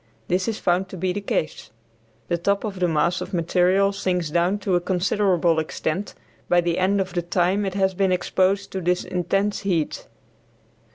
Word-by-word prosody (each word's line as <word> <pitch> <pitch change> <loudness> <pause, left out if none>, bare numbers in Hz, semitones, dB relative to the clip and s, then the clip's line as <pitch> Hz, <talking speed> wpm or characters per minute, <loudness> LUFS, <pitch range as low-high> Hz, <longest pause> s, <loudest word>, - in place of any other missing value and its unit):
This 185 +1 +1
is 225 -2 -1
found 185 +2 0
to 190 - -8
be 180 +1 -1
the 205 - -3
case. 160 -5 -3 0.6
The 170 - -1
top 200 +3 0
of 200 -4 -4
the 180 - +2
mass 170 +2 +1
of 195 - -4
material 180 +3 +2
sinks 180 -5 -2
down 175 +5 +2
to 190 - +1
a 175 - +3
considerable 180 -2 +1
extent 160 +4 -3 0.3
by 175 - +5
the 175 0 0
end 195 +2 +2
of 190 -2 -2
the 175 - 0
time 180 +3 +1
it 190 - -4
has 190 -1 +1
been 190 0 +1
exposed 190 +2 +1
to 190 - -3
this 180 +1 +1
intense 195 +3 -1
heat. 180 -6 -2
185 Hz, 185 wpm, -23 LUFS, 175-195 Hz, 0.6 s, by